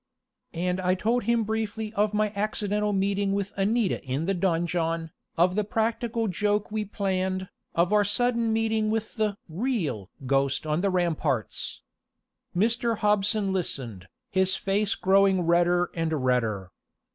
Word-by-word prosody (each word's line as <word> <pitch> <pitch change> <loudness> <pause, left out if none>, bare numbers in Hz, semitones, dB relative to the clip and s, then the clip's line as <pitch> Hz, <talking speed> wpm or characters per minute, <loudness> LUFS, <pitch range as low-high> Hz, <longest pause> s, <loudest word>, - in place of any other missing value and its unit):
And 180 +2 -1
I 185 0 +2
told 230 +4 0
him 235 0 +2
briefly 220 0 -3
of 210 0 +2
my 210 0 0
accidental 210 0 0
meeting 195 0 +1
with 200 0 -2
Anita 205 +2 +1
in 135 +3 -2
the 195 - +1
donjon, 165 -2 0 0.3
of 175 +2 +4
the 210 - +2
practical 225 +2 -1
joke 210 +3 0
we 215 -1 -1
planned, 190 -2 -2 0.3
of 170 +4 +2
our 210 -1 +5
sudden 235 +2 +2
meeting 220 -1 +1
with 220 0 -2
the 210 -2 0
real 165 - -2 0.2
ghost 135 +2 +1
on 155 +2 0
the 200 - +2
ramparts. 160 - -1 0.7
Mr. 230 +2 +1
Hobson 210 -1 +2
listened, 120 - -3 0.2
his 190 0 +2
face 200 +2 0
growing 195 -1 +4
redder 175 +1 +2
and 165 -1 -1
redder. 110 -7 0
195 Hz, 140 wpm, -26 LUFS, 170-215 Hz, 0.7 s, our